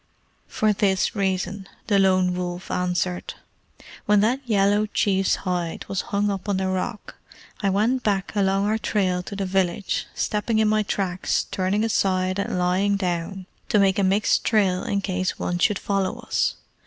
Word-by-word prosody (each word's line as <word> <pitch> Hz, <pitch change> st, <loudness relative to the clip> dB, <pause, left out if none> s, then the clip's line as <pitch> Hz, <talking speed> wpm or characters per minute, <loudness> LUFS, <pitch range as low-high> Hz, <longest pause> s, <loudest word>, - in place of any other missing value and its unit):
"For 215 Hz, -1 st, +1 dB
this 195 Hz, -1 st, +1 dB
reason," 190 Hz, 0 st, -2 dB, 0.2 s
the 200 Hz, -2 st, +3 dB
Lone 185 Hz, -1 st, +3 dB
Wolf 180 Hz, 0 st, -4 dB
answered: 180 Hz, 0 st, -1 dB, 0.7 s
"when 210 Hz, 0 st, +5 dB
that 240 Hz, +5 st, +2 dB
yellow 205 Hz, 0 st, +3 dB
chief's 195 Hz, -2 st, +1 dB
hide 175 Hz, -3 st, -2 dB
was 195 Hz, -, -1 dB
hung 205 Hz, 0 st, +1 dB
up 195 Hz, +1 st, -5 dB
on 200 Hz, -, +1 dB
the 190 Hz, 0 st, -1 dB
rock, 185 Hz, +4 st, -4 dB, 0.4 s
I 200 Hz, -, +2 dB
went 220 Hz, +7 st, +1 dB
back 200 Hz, -2 st, -1 dB
along 195 Hz, 0 st, +2 dB
our 215 Hz, +1 st, +1 dB
trail 185 Hz, -5 st, 0 dB
to 200 Hz, +3 st, -8 dB
the 195 Hz, -1 st, -2 dB
village, 190 Hz, 0 st, -1 dB
stepping 215 Hz, +2 st, -1 dB
in 220 Hz, 0 st, +3 dB
my 215 Hz, 0 st, +3 dB
tracks, 190 Hz, -3 st, -1 dB
turning 190 Hz, +3 st, 0 dB
aside, 185 Hz, -3 st, +1 dB
and 200 Hz, -, -2 dB
lying 185 Hz, +3 st, +2 dB
down, 180 Hz, 0 st, -3 dB, 0.2 s
to -, -, +3 dB
make 195 Hz, -1 st, +3 dB
a -, -, +2 dB
mixed 195 Hz, +3 st, +2 dB
trail 195 Hz, -5 st, +2 dB
in 200 Hz, 0 st, -1 dB
case 185 Hz, -1 st, -2 dB
one 175 Hz, 0 st, -2 dB
should 205 Hz, +2 st, +2 dB
follow 195 Hz, -2 st, -1 dB
us. -, -, -1 dB
195 Hz, 165 wpm, -24 LUFS, 185-205 Hz, 0.7 s, when